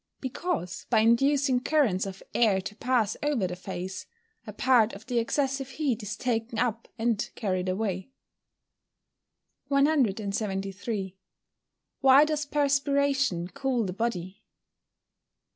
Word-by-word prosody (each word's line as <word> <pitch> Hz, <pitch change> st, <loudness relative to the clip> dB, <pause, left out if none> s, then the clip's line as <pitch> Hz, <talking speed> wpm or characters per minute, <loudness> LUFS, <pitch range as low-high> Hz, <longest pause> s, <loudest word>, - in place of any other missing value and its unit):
_ -, -, -56 dB
Because, 260 Hz, -, -3 dB
by 225 Hz, -2 st, +4 dB
inducing 265 Hz, +3 st, +3 dB
currents 245 Hz, -10 st, +1 dB
of 195 Hz, 0 st, -8 dB
air 215 Hz, -5 st, +3 dB
to 195 Hz, +2 st, -7 dB
pass 235 Hz, -3 st, +1 dB
over 290 Hz, -9 st, +1 dB
the 180 Hz, 0 st, -3 dB
face, 185 Hz, 0 st, -6 dB, 0.4 s
a -, -, -5 dB
part 240 Hz, -4 st, +3 dB
of 200 Hz, +2 st, -10 dB
the 245 Hz, -2 st, 0 dB
excessive 270 Hz, +2 st, -1 dB
heat 265 Hz, -4 st, -1 dB
is 210 Hz, 0 st, -5 dB
taken 230 Hz, -2 st, -2 dB
up 230 Hz, -2 st, -1 dB
and 225 Hz, -2 st, 0 dB
carried 185 Hz, -3 st, -1 dB
away. 190 Hz, +1 st, -2 dB, 1.6 s
173. 205 Hz, -7 st, 0 dB, 0.9 s
_Why 270 Hz, +2 st, +8 dB
does 300 Hz, -1 st, -2 dB
perspiration 280 Hz, -, +1 dB
cool 265 Hz, -3 st, -1 dB
the 180 Hz, -, -3 dB
body? 200 Hz, -3 st, -3 dB
230 Hz, 120 wpm, -27 LUFS, 195-275 Hz, 1.6 s, Why